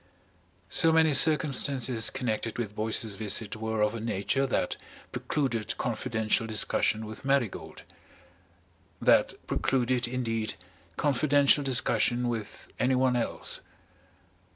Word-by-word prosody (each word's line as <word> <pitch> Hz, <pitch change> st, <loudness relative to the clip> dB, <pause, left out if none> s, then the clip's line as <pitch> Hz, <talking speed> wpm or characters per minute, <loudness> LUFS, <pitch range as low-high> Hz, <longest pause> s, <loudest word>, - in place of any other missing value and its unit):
So 165 Hz, -, +5 dB
many 160 Hz, -1 st, +4 dB
circumstances 135 Hz, -5 st, +2 dB
connected 115 Hz, -3 st, -3 dB
with 110 Hz, -4 st, -4 dB
Boyce's 110 Hz, 0 st, 0 dB
visit 110 Hz, 0 st, -1 dB
were 110 Hz, 0 st, -2 dB
of 105 Hz, +1 st, +1 dB
a 115 Hz, -, -5 dB
nature 115 Hz, +5 st, -1 dB
that -, -, -1 dB, 0.4 s
precluded 125 Hz, -7 st, -2 dB
confidential 110 Hz, -1 st, -1 dB
discussion 110 Hz, 0 st, +1 dB
with 110 Hz, 0 st, -9 dB
Marigold, 135 Hz, -6 st, -2 dB, 1.2 s
that -, -, +3 dB
precluded, 125 Hz, -1 st, 0 dB
indeed, 115 Hz, -3 st, -3 dB, 0.4 s
confidential 145 Hz, 0 st, +3 dB
discussion 120 Hz, -2 st, +1 dB
with 110 Hz, -4 st, -6 dB
anyone 130 Hz, 0 st, +2 dB
else. 120 Hz, -, -1 dB
120 Hz, 105 wpm, -28 LUFS, 110-135 Hz, 1.2 s, So